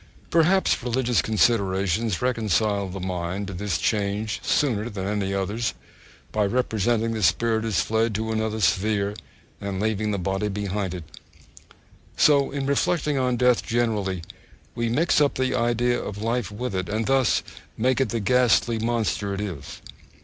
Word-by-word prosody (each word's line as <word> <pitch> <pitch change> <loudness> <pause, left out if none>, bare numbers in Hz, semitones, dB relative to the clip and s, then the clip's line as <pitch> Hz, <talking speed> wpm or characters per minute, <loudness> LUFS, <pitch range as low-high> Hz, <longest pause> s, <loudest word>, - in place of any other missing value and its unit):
Perhaps 175 +4 +3
religious 125 -1 +1
considerations 100 -2 +1
reconcile 110 -4 +1
the 95 +1 -6
mind 90 +1 -3
to 95 - -7
this 95 -2 -2
change 105 +3 -1
sooner 120 -6 +1
than 95 -3 -5
any 100 -1 -1
others, 100 +4 -2 0.6
by 105 - +1
representing 115 0 +1
the 110 - -3
spirit 110 +6 +2
as 105 -7 +1
fled 110 0 0
to 110 +2 -2
another 110 0 -1
sphere, 100 +2 +1 0.5
and 100 -2 -3
leaving 110 0 0
the 100 - 0
body 95 +3 -1
behind 100 -2 -3
it. 90 - -6 1.1
So 140 -2 +4
in 140 -1 -3
reflecting 145 +1 +1
on 125 -1 +1
death 125 0 +3
generally, 105 -7 -1 0.5
we 115 -1 -1
mix 150 +6 +2
up 145 - +2
the 130 0 0
idea 120 0 +1
of 100 -1 -6
life 115 -1 -1
with 115 +2 -4
it, 95 -2 -2
and 110 +2 -1
thus 135 -3 +2 0.3
make 130 +4 +2
it 130 - +1
the 115 - -1
ghastly 115 +1 +3
monster 110 -3 -1
it - - -5
is. 85 -9 -6
110 Hz, 155 wpm, -24 LUFS, 100-120 Hz, 1.1 s, So